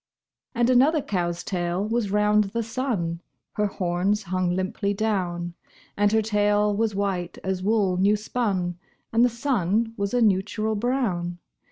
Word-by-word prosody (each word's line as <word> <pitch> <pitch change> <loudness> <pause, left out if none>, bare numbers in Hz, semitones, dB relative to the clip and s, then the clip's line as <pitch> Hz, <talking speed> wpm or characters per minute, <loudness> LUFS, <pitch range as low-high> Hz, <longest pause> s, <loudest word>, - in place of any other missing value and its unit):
And 240 +1 +3
another 280 +4 +4
cow's 175 -3 -2
tail 180 +1 -2
was 225 -2 0
round 210 +1 +3
the 230 +4 -3
sun 220 -8 -2 0.3
(Her 210 0 +1
horns 190 +2 0
hung 185 0 -1
limply 200 +2 -1
down); 180 -5 -1 0.4
And 205 0 +2
her 220 0 +3
tail 210 -1 +2
was 220 -1 0
white 190 -3 -2
as 190 -1 -2
wool 200 -2 +2
new 200 +3 +4
spun, 195 -5 -2 0.3
And 230 +1 +5
the 245 - +5
sun 230 -3 0
was 200 +3 -1
a - - +3
neutral 215 +2 +1
brown. 205 -7 -1
205 Hz, 150 wpm, -25 LUFS, 185-225 Hz, 0.4 s, And